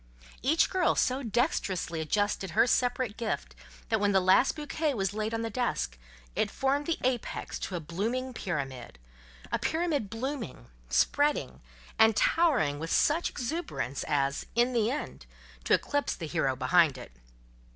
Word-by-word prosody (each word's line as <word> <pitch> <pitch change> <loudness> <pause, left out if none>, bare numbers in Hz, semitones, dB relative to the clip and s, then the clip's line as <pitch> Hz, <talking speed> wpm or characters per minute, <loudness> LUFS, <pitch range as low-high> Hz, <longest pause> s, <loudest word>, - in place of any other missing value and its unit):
Each 310 +6 +3
girl 370 -2 +2
so 260 +2 +1
dexterously 200 - -1
adjusted 205 +3 0
her - - +7
separate 245 -2 0
gift, 230 -2 -3 0.4
that 220 - +2
when 205 0 +2
the 190 - +5
last 185 - +4
bouquet 300 -1 -2
was 195 -2 -1
laid 215 +1 -2
on 225 0 -2
the 225 - -3
desk, 60 - -1 0.4
it - - +1
formed 280 +2 0
the 335 - 0
apex 250 -2 -2
to 185 - -4
a - - -1
blooming 225 +11 -3
pyramid—a 60 - -6
pyramid 320 - 0
blooming, 225 - -5 0.2
spreading, 290 - +1 0.4
and 220 -1 +6
towering 245 - +2
with 165 +1 -4
such 325 +3 +3
exuberance 240 - -3
as, 140 -1 0
in 240 +2 +3
the 225 -2 +2
end, 290 +4 -5 0.4
to - - +5
eclipse 285 0 -1
the 165 - -6
hero 150 -5 0
behind 140 +2 +3
it. 125 - -10
220 Hz, 150 wpm, -29 LUFS, 160-265 Hz, 0.4 s, her